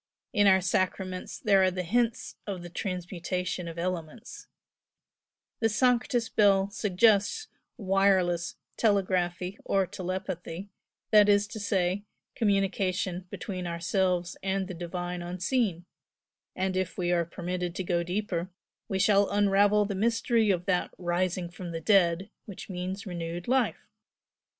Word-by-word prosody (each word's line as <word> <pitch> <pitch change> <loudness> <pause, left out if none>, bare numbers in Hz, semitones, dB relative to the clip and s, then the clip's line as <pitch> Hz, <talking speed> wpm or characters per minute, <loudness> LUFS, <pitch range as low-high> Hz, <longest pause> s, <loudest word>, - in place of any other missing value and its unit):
In 205 -3 +4
our 190 -1 +6
sacraments 185 0 -1
there 200 -4 +4
are 185 - +5
the 185 0 -3
hints 230 +5 0
of 190 -4 -4
the 175 - -9
transmutation 180 -1 -3
of 165 0 -7
elements, 175 +4 -5 1.1
the 225 - +2
'Sanctus' 240 +1 +2
bell 200 -2 +3
suggests 210 - +2 0.3
wireless 190 -4 +2 0.2
telegraphy 185 -3 +1
or 195 -1 +2
telepathy, 185 -1 -5 0.4
that 210 -1 +7
is 205 0 +5
to 220 0 -6
say, 195 -1 0 0.3
communication 190 -3 0
between 185 -3 -5
ourselves 180 +1 0
and 190 0 -1
the 190 - -6
divine 175 +1 -4
Unseen, 180 +1 -1 0.7
and 185 0 -1
if 185 -1 -2
we 175 -1 0
are 175 -1 +3
permitted 175 +1 -4
to 190 - -2
go 175 -1 0
deeper, 180 0 -2 0.4
we 190 - -1
shall 200 +1 +4
unravel 205 +1 +4
the 200 - -3
mystery 225 +2 +2
of 180 -2 +1
that 180 -2 +1
'rising 175 0 -1
from 175 +1 -8
the 165 -1 -4
dead' 185 0 +3
which 200 -1 -9
means 185 +3 -4
renewed 175 -2 -5
life. 255 0 +1
185 Hz, 130 wpm, -28 LUFS, 175-205 Hz, 1.1 s, that